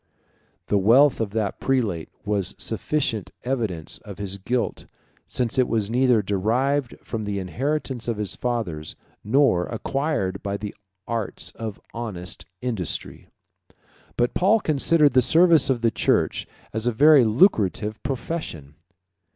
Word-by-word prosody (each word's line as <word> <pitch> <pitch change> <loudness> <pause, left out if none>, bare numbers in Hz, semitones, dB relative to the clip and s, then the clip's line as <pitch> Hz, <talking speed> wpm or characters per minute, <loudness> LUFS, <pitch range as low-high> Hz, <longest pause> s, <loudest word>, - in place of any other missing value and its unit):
The 100 - +1
wealth 125 +7 +5
of 110 - -1
that 110 -3 -2
prelate 110 -12 0 0.2
was 100 -3 0
a - - -36
sufficient 115 -3 -1
evidence 110 -11 -3
of 100 -4 -10
his 100 -1 -3
guilt, 120 +5 -2 0.4
since 125 0 -1
it 125 - +4
was 110 -2 0
neither 125 -3 +3
derived 120 +7 0
from 110 -2 -4
the 100 -1 -3
inheritance 130 +5 -3
of 115 -3 -1
his 105 -2 -2
fathers, 100 -11 -3 0.3
nor 110 -7 +3
acquired 135 -10 -2
by 100 0 -3
the 105 0 -6 0.3
arts 115 -3 -3
of 110 -3 -6
honest 105 -7 -5
industry. 110 -10 -3 0.9
But 120 0 +1
Paul 205 +5 +4
considered 155 -2 +3
the 130 - +6
service 165 +4 +5
of 125 -3 +1
the 115 -1 +2
church - - +1 0.3
as 110 +2 -2
a - - +3
very 145 +3 +6
lucrative 110 - +2
profession. 130 - -5
115 Hz, 135 wpm, -24 LUFS, 100-135 Hz, 0.9 s, the